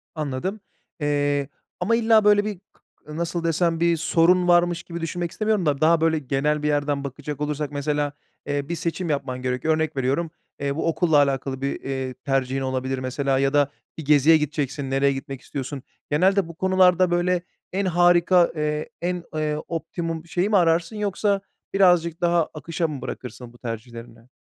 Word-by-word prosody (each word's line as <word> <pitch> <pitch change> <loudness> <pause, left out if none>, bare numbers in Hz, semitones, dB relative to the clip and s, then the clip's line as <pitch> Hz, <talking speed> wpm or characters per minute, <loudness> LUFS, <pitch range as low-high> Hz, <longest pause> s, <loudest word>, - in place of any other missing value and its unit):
Anladım, 155 +7 -3 0.4
eee, 145 -1 0 0.3
ama 195 +6 +2
illa 225 -2 +4
böyle 205 0 +5
bir 210 -4 -4
kı 150 +1 -14
nasıl 170 0 -2
desem, 165 0 +1
bir 170 0 +3
sorun 175 +3 +3
varmış 175 -1 +3
gibi 170 -1 -7
düşünmek 170 +1 -3
istemiyorum 215 -4 0
da 145 -2 0
daha 160 +1 +4
böyle 160 -1 +2
genel 150 +2 -1
bir - - +1
yerden 145 -1 0
bakacak 145 +1 -6
olursak 150 -1 -2
mesela, 145 0 -1 0.3
eee, 145 +1 -2
bir 170 - -1
seçim 170 +1 -3
yapman 130 -3 -2
gerekiyor. 130 +5 0
Örnek 160 -1 -2
veriyorum, 140 +6 0 0.3
eee, 140 0 -2
bu 160 - -1
okulla 165 -1 +2
alakalı 135 -2 +1
bir, 140 0 -2
eee, 130 -1 -3
tercihin 135 +1 -1
olabilir 130 0 -2
mesela 130 +1 0
ya 135 0 +1
da 145 -1 +3 0.3
bir 160 - -6
geziye 150 +2 +6
gideceksin, 145 -2 -3
nereye 140 +1 +2
gitmek 135 0 -7
istiyorsun? 135 0 -6 0.3
Genelde 185 +4 +3
bu 170 - -10
konularda 185 -1 +3
böyle 175 0 +1 0.3
en 195 +1 0
harika, 175 0 +4
eee, 150 0 -2
en, 175 0 -2
eee, 155 -1 0
optimum 165 0 -4
şeyi 175 +4 -1
mi 210 - +4
ararsın 170 +3 +2
yoksa 205 -1 0 0.3
birazcık 175 -3 +3
daha 170 -1 +3
akışa 165 +3 -2
mı 145 -4 -6
bırakırsın 125 0 -7
bu - - -17
tercihlerini? 115 0 -8
155 Hz, 170 wpm, -23 LUFS, 140-175 Hz, 0.4 s, geziye